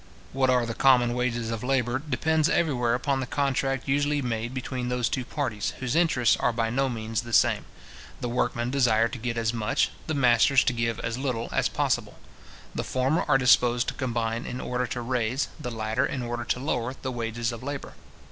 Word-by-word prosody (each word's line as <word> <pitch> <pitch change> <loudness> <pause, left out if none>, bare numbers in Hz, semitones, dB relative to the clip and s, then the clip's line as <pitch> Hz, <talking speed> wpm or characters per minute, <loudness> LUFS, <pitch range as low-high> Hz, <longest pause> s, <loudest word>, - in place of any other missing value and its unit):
What 130 -1 +2
are 125 -2 +3
the 115 - -3
common 125 -2 +4
wages 120 -2 -1
of 115 0 -4
labour, 125 -1 +1
depends 155 +2 +1
everywhere 125 -8 +1
upon 135 +2 0
the 130 - -3
contract 135 -2 -1
usually 145 +2 +1
made 120 -3 -2
between 130 -1 -4
those 125 -1 0
two 130 - -2
parties, 120 -6 -3
whose 130 0 -2
interests 160 -8 +3
are 125 - +1
by 115 -1 -1
no 135 +2 +1
means 110 -2 -2
the 120 - -9
same. - - +3 0.5
The 120 - -3
workmen 120 0 -1
desire 120 -4 +3
to 125 +1 -7
get 120 0 -3
as 115 0 0
much, 120 +4 0 0.2
the 155 - -1
masters 130 +1 +4
to 125 - +1
give 115 -1 -1
as 115 +2 -3
little, 125 -4 -2
as - - +1
possible. - - -1 0.6
The - - -2
former 130 +5 0
are 140 -3 +5
disposed 125 -1 +4
to - - -5
combine 115 -2 -2
in 125 - -5
order 125 0 -2
to 120 - -4
raise, 125 +2 -1
the 145 - -4
latter 110 +3 -1
in 130 - -4
order 120 0 -4
to - - -1
lower, 125 -2 -2
the 130 - -4
wages 115 -1 -2
of 115 - -7
labour. 140 +1 -5
125 Hz, 200 wpm, -26 LUFS, 115-135 Hz, 0.6 s, are